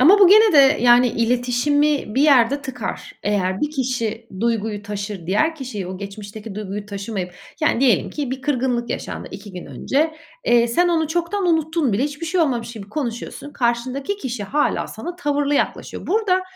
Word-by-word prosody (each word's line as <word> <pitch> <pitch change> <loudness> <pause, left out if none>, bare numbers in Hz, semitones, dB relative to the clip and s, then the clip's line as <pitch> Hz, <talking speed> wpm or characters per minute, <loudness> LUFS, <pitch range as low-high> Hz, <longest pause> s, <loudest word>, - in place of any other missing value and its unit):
Ama 355 +11 +7
bu 390 -3 +8
gene 430 +2 +7
de, 280 -1 +6
yani, 245 +1 +6
iletişimi 245 +3 +1
bir 270 - +3
yerde 280 -1 +4
tıkar. 250 -5 -6
Eğer 190 -2 0
bir 300 - 0
kişi 235 -5 -2
duyguyu 225 -3 -1
taşır, 200 -3 -5
diğer 305 - +2
kişiye; 245 - -5
o 185 0 -6
geçmişteki 205 +1 -8
duyguyu 205 0 -5
taşımayıp, 195 -3 -5 0.3
yani 305 -6 +2
diyelim 245 -8 +3
ki 285 -4 -4
bir 260 0 -5
kırgınlık 255 -4 0
yaşandı - - -5
2 205 - -9
gün 180 -1 -8
önce. 310 +3 -1 0.3
Eee, 235 0 +4
sen 350 +10 +2
onu 320 -3 +1
çoktan 345 +4 -1
unuttun 320 - +1
bile, 210 - +1
hiçbir 295 +3 -5
şey 355 +2 +1
olmamış 240 -7 0
gibi 210 -4 -9
konuşuyorsun. 260 +2 -5
Karşındaki 255 +8 -1
kişi 250 - -4
hâlâ 290 +8 0
sana 350 0 -7
tavırlı 290 -3 0
yaklaşıyor. - - -2
Burada 375 -2 +2
250 Hz, 170 wpm, -21 LUFS, 220-300 Hz, 0.3 s, bu